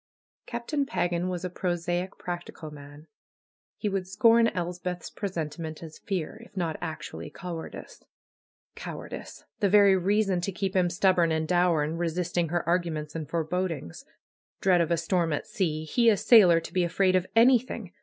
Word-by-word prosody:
Captain 250 +5 -2
Pagan 175 -8 -1
was 180 0 -3
a - - -2
prosaic, 175 +1 -2
practical 175 -3 -6
man. 145 +1 -12 0.7
He 215 - -2
would 195 -2 -2
scorn 230 +4 +5
Elspeth's 180 -1 -4
presentiment 165 -4 -5
as 160 -1 -10
fear; 195 +3 -4
if 220 - -17
not 165 -4 -1
actually 155 -2 -6
cowardice. 170 +1 -8 0.7
Cowardice! - - -8 0.2
The 200 - +2
very 200 -1 +6
reason 195 0 +1
to 195 - -2
keep 195 +1 -3
him 180 -2 +3
stubborn 175 -1 +3
and 160 0 0
dour 175 -3 +3
in 155 +3 -3
resisting 175 0 -1
her 175 +1 -1
arguments 165 -4 -1
and 155 -2 -5
forebodings. 165 - -3 0.6
Dread 180 -3 +4
of 165 - 0
a 170 - +2
storm 165 0 0
at 145 - -2
sea! 155 -5 -2
He, 235 +8 +3
a 210 - +4
sailor, 190 -9 +6
to 165 - -10
he 180 - +2
afraid 185 +2 +2
of 185 0 +1
anything! 235 -4 +3
175 Hz, 160 wpm, -27 LUFS, 165-195 Hz, 0.7 s, very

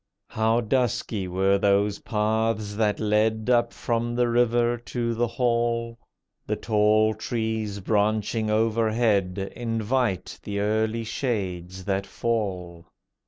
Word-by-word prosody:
How 110 +2 +2
dusky 110 -4 -1
were 95 +2 +2
those 100 +1 +2
paths 110 -1 -1
that 105 -1 0
led 110 +2 +1
Up 120 -1 +3
from 120 0 -2
the 120 0 +2
river 120 0 +2
to 120 0 -3
the 120 +1 0
hall. 115 -1 0 0.5
The - - 0
tall 110 0 +3
trees 110 -2 -3
branching 110 +2 0
overhead 110 -3 +1
Invite 115 -2 -1
the 100 -1 -4
early 110 +2 0
shades 95 -7 -3
that 100 -1 -1
fall. 90 -7 -3
110 Hz, 115 wpm, -25 LUFS, 100-115 Hz, 0.5 s, Up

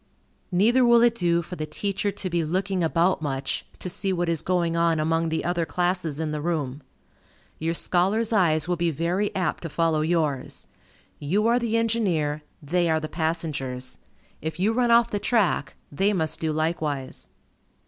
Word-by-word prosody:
Neither 225 +8 +4
will 235 -1 +6
it 240 -1 +5
do 170 -5 +1
for 180 - -7
the 155 -2 -4
teacher 200 +5 -2
to 195 -1 -5
be 170 -2 0
looking 185 +3 -1
about 170 +2 +2
much, 135 -2 -3
to - - -6
see 190 +2 -1
what 175 -2 0
is 165 -3 0
going 175 -2 0
on 170 -1 +2
among 165 +1 +1
the 160 - -2
other 175 -1 0
classes 175 -3 -1
in 160 -1 -2
the 150 -1 -3
room. 150 -4 -2 0.8
Your 165 +1 -1
scholars' 200 +7 +1
eyes 160 -6 +3
will 175 -1 0
be 170 0 +1
very 170 +7 0
apt 185 -2 -1
to 165 - -5
follow 160 0 +1
yours. 155 -5 -1 0.5
You 185 +9 0
are 235 +2 +4
the 230 -1 0
engineer, 185 -10 0 0.2
they 175 +3 +1
are 160 0 +2
the 155 - -4
passengers. 155 -6 -3 0.4
If 160 +2 -4
you 210 +4 +2
run 245 0 +2
off 235 0 +5
the 205 - -1
track, 200 - +1 0.2
they 195 +8 +1
must 160 -5 -1
do 160 -1 -1
likewise. 155 -4 -2
170 Hz, 180 wpm, -25 LUFS, 155-195 Hz, 0.8 s, will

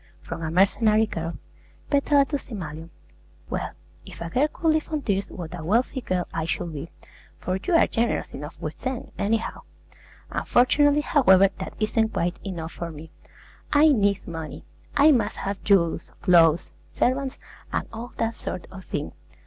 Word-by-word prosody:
H.T. - - -28
Peck - - -21
FROM - - -4
A 160 - -2
MERCENARY 210 +5 +4
GIRL 170 -5 -4 0.5
PETALA 285 0 +4
TO 285 +1 -2
SIMALION 165 - -7 0.6
Well, - - -2 0.3
if - - -12
a 170 0 -5
girl 270 - +3
could 330 - 0
live 310 0 -1
on 305 -2 -1
tears, 200 -3 0
what 175 -3 -7
a 165 - -7
wealthy 235 - +1
girl 180 -5 -1
I 160 -1 -1
should 165 0 -2
be; 150 +3 -6 0.5
for 185 +1 -2
you 350 - +1
are - - +6
generous 230 0 -1
enough 150 +3 -8
with 155 0 -5
them, 260 -2 -4
any 215 +3 +2
how! 225 - -6 0.7
Unfortunately, 290 +4 +3
however, 195 - +5
that - - -6
isn't 220 +1 +1
quite 175 +1 -1
enough 170 -5 -5
for 170 - -5
me. 160 0 -10 0.6
I 300 +2 +7
need 200 -7 +2
money; 160 -3 -6 0.3
I 290 +2 +7
must 245 -6 +1
have 200 0 -4
jewels, 180 -5 +2
clothes, 170 -3 +5 0.2
servants, 265 +1 0 0.3
and - - -1
all 230 +2 -7
that 225 0 0
sort 180 - -5
of 190 0 -9
thing. 150 - -3
200 Hz, 175 wpm, -25 LUFS, 170-255 Hz, 0.7 s, I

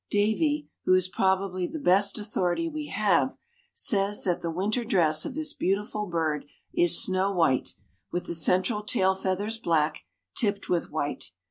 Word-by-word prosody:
Davie, 290 +9 +1 0.2
who 185 - +5
is 185 -1 +2
probably 190 -1 0
the 320 - -6
best 200 - +2
authority 210 - -1
we 310 -2 -5
have, 210 +3 +1 0.3
says 200 -2 +1
that 180 -2 0
the 170 - -3
winter 200 +8 -1
dress 165 -9 +2
of - - -5
this 315 0 -3
beautiful 210 +2 -2
bird 160 -4 -1 0.3
is 175 0 +6
snow 190 +1 +2
white, 165 -9 +1 0.4
with 175 - -3
the - - -4
central 185 +6 +2
tail 190 -2 +2
feathers 195 +4 -2
black, 160 -6 0 0.3
tipped 205 -4 -1
with 175 -2 0
white. 145 -1 -3
190 Hz, 155 wpm, -27 LUFS, 175-210 Hz, 0.4 s, is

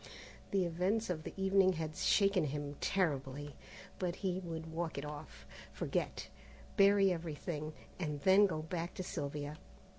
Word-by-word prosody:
The 195 -2 +2
events 185 +5 0
of 160 -3 -2
the - - -7
evening 190 -1 +4
had 160 -2 -3
shaken 195 -5 +3
him 145 0 -3
terribly, 145 -5 0 0.4
but 180 -2 -1
he 185 -1 +1
would 160 -3 -6
walk 165 -2 -2
it 140 - -3
off, 150 0 -8 0.3
forget, - - -2 0.5
bury 200 -1 +6
everything, 155 -2 -4 0.3
and 150 -5 -2
then 195 +5 +7
go 155 -4 -3
back 170 +1 -3
to 185 - -3
Sylvia. 145 -2 -4
165 Hz, 145 wpm, -35 LUFS, 150-190 Hz, 0.5 s, then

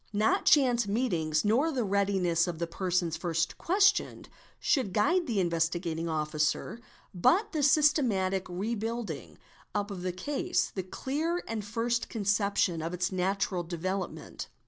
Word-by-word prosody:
Not 210 +2 +2
chance 245 -6 +4
meetings 175 -9 0
nor 255 +10 +3
the 255 -5 -1
readiness 190 -4 +1
of 170 -2 -3
the 170 - -1
persons 175 -1 -1
first 165 -1 -2
questioned, 405 +3 +2 0.3
should 250 -10 +1
guide 345 - +2
the 220 -4 0
Investigating 170 -1 -1
Officer; 155 +6 -1 0.3
but 380 - +3
the 310 - -1
systematic 255 - +3
re 195 +6 -2
building 210 - -4 0.4
up 205 0 -1
of 190 -3 -6
the 185 0 -2
case, 230 +11 -1
the 190 - -2
clear 300 - -2
and 225 -2 -3
first 230 +3 -1
conception 200 -5 +1
of 165 +3 -3
its 180 +1 -1
natural 190 0 0
development. 180 +3 -4
195 Hz, 140 wpm, -29 LUFS, 175-235 Hz, 0.4 s, chance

